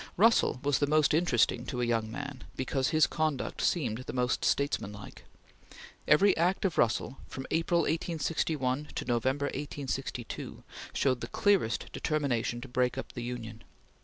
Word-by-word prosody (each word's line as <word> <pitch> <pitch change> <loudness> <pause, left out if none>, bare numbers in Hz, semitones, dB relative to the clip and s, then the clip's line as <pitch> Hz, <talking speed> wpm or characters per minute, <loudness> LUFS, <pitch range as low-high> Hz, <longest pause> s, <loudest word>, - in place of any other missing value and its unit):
Russell 225 - +4
was 145 -1 +2
the 145 - +2
most 155 0 +3
interesting 125 -7 +2
to 125 - -3
a 120 - +1
young 115 -2 0
man 140 0 -6
because 130 0 0
his 155 -1 +5
conduct 155 -4 -2
seemed 130 -7 0
most 125 -1 0
statesmanlike. 105 -8 -1 0.8
Every 185 +6 +5
act 180 +4 +1
of 180 - 0
Russell, 120 +3 +1
from 130 - -7
April, 170 +1 +2
1861, 150 -4 -1
to - - -3
November, 130 +4 +1
1862, 135 -4 -5 0.3
showed 130 -3 +1
the - - -4
clearest 195 - +1
determination 125 -6 -1
to 135 - -7
break 125 0 0
up - - -5
the 120 - -5
Union. 115 -2 -6
135 Hz, 145 wpm, -30 LUFS, 120-155 Hz, 0.8 s, his